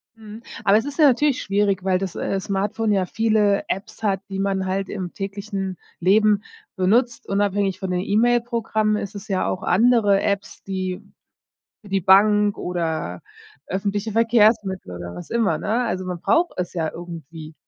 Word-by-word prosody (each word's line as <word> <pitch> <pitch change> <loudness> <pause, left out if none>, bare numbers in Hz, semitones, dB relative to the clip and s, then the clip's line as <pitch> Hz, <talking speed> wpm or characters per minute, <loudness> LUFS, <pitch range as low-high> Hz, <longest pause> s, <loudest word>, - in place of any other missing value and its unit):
Mhm, 220 0 -11 0.2
aber 200 +1 +5
es 225 - -1
ist 285 +2 -6
ja 300 - +7
natürlich 275 +1 +2
schwierig, 200 -1 0
weil 185 -1 +2
das, 190 -3 -4
äh, 195 - -2
Smartphone 205 +3 -1
ja 190 -2 +2
viele 215 -1 +2
Apps 195 +3 -5
hat, 195 -2 +1
die 195 - -4
man 195 -1 0
halt 190 +1 -2
im 185 -3 -5
täglichen 195 -1 -5 0.2
Leben 210 +3 +3 0.3
benutzt. 230 +6 +1
Unabhängig 200 -1 0
von 190 -1 -3
den 180 - 0
E-Mail-Programmen 225 0 +1
ist 205 -1 -5
es 200 +1 -8
ja 190 -2 0
auch 185 - -3
andere 205 -1 +4
Apps, 200 -1 -3
die 185 -1 -4 0.8
für 205 - -15
die 195 0 0
Bank 205 +2 +5
oder 170 -3 -3 0.5
öffentliche 200 +3 -2
Verkehrsmittel 215 - +2
oder 85 0 -7
was 175 - -9
immer, 220 -9 +1
ne? 225 +4 0
Also 185 -4 -3
man 180 -1 -4
braucht 330 - +2
es 180 -1 -3
ja 160 -3 -1
irgendwie. 165 -2 -9
200 Hz, 165 wpm, -22 LUFS, 185-215 Hz, 0.8 s, ja